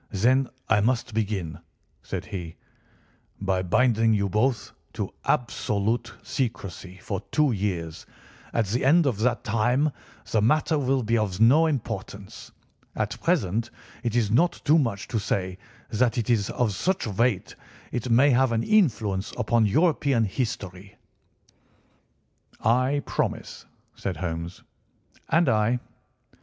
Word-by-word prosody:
"Then 125 Hz, +6 st, +2 dB, 0.2 s
I 110 Hz, -2 st, +3 dB
must 120 Hz, +1 st, 0 dB
begin," 100 Hz, -7 st, -2 dB, 0.4 s
said -, -, -5 dB
he, 85 Hz, -4 st, -6 dB, 0.8 s
"by 95 Hz, -2 st, 0 dB
binding 115 Hz, +3 st, +3 dB
you 100 Hz, -1 st, 0 dB
both 110 Hz, +4 st, 0 dB, 0.2 s
to -, -, -4 dB
absolute 115 Hz, 0 st, 0 dB
secrecy 95 Hz, -, -4 dB
for 100 Hz, -2 st, -4 dB
two 150 Hz, -3 st, +3 dB
years; 90 Hz, -7 st, -3 dB, 0.4 s
at 115 Hz, -, +1 dB
the 115 Hz, +6 st, -1 dB
end 160 Hz, +5 st, +5 dB
of 120 Hz, -7 st, 0 dB
that 120 Hz, +1 st, +1 dB
time 120 Hz, +7 st, +1 dB, 0.4 s
the 110 Hz, -, +3 dB
matter 155 Hz, +6 st, +2 dB
will 135 Hz, -1 st, +1 dB
be 115 Hz, +1 st, +1 dB
of 100 Hz, -3 st, -2 dB
no 140 Hz, +9 st, +6 dB
importance. 110 Hz, -8 st, -5 dB, 0.4 s
At 105 Hz, -1 st, -3 dB
present 115 Hz, -, 0 dB, 0.3 s
it 120 Hz, -2 st, -2 dB
is 110 Hz, -4 st, +2 dB
not 170 Hz, +10 st, +3 dB
too 155 Hz, +2 st, +5 dB
much 115 Hz, -8 st, -2 dB
to 115 Hz, -, 0 dB
say 95 Hz, -2 st, -2 dB, 0.3 s
that 115 Hz, +1 st, +1 dB
it 120 Hz, 0 st, 0 dB
is 105 Hz, -4 st, +1 dB
of 115 Hz, -4 st, 0 dB
such 185 Hz, -, -1 dB
weight 110 Hz, -1 st, 0 dB, 0.4 s
it 125 Hz, 0 st, -3 dB
may 130 Hz, +5 st, +5 dB
have 130 Hz, 0 st, +3 dB
an 115 Hz, 0 st, 0 dB
influence 110 Hz, -, +1 dB
upon 115 Hz, -2 st, +2 dB
European 140 Hz, -, +2 dB
history." 100 Hz, -4 st, -4 dB, 1.6 s
"I 130 Hz, +5 st, +2 dB
promise," -, -, -3 dB, 0.3 s
said 95 Hz, -, -4 dB
Holmes. 85 Hz, 0 st, -5 dB, 0.7 s
"And 170 Hz, -1 st, +3 dB
I." 110 Hz, +1 st, +2 dB
115 Hz, 130 wpm, -25 LUFS, 100-130 Hz, 1.6 s, no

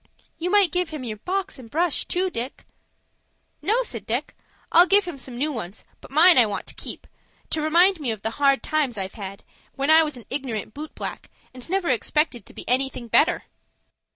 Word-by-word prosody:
"You 345 Hz, +2 st, -1 dB
might 400 Hz, -4 st, +4 dB
give 360 Hz, -1 st, 0 dB
him 305 Hz, -4 st, -6 dB
your 220 Hz, -3 st, -5 dB
box 380 Hz, -, -3 dB
and 235 Hz, -3 st, -12 dB
brush, 330 Hz, +4 st, 0 dB
too, 370 Hz, +1 st, -1 dB
Dick." 245 Hz, +1 st, -5 dB, 1.0 s
"No," 470 Hz, +5 st, +2 dB
said 230 Hz, -, -6 dB
Dick; 245 Hz, +6 st, -2 dB, 0.4 s
"I'll 350 Hz, +2 st, +7 dB
give 400 Hz, +2 st, +5 dB
him 315 Hz, -6 st, -6 dB
some 245 Hz, -1 st, -6 dB
new 300 Hz, +4 st, 0 dB
ones, 215 Hz, -7 st, -7 dB
but -, -, -14 dB
mine 320 Hz, +3 st, +7 dB
I 235 Hz, -, +6 dB
want 205 Hz, -, -4 dB
to -, -, -6 dB
keep, -, -, -7 dB, 0.5 s
to 315 Hz, -, 0 dB
remind 345 Hz, +4 st, +4 dB
me 280 Hz, -5 st, -2 dB
of 220 Hz, -3 st, -4 dB
the 225 Hz, -, -1 dB
hard 275 Hz, -1 st, +4 dB
times 290 Hz, -7 st, 0 dB
I've 190 Hz, -1 st, -4 dB
had, 195 Hz, -2 st, -8 dB, 0.3 s
when 275 Hz, +2 st, +1 dB
I 320 Hz, +1 st, +8 dB
was 300 Hz, -4 st, -2 dB
an 235 Hz, -, -12 dB
ignorant 250 Hz, -6 st, -3 dB
boot 300 Hz, +2 st, -8 dB
black, -, -, -6 dB, 0.2 s
and 255 Hz, +4 st, -11 dB
never 380 Hz, -2 st, 0 dB
expected 260 Hz, +1 st, 0 dB
to -, -, -11 dB
be -, -, -9 dB
anything 250 Hz, -1 st, -1 dB
better." -, -, +3 dB
285 Hz, 205 wpm, -24 LUFS, 240-345 Hz, 1.0 s, I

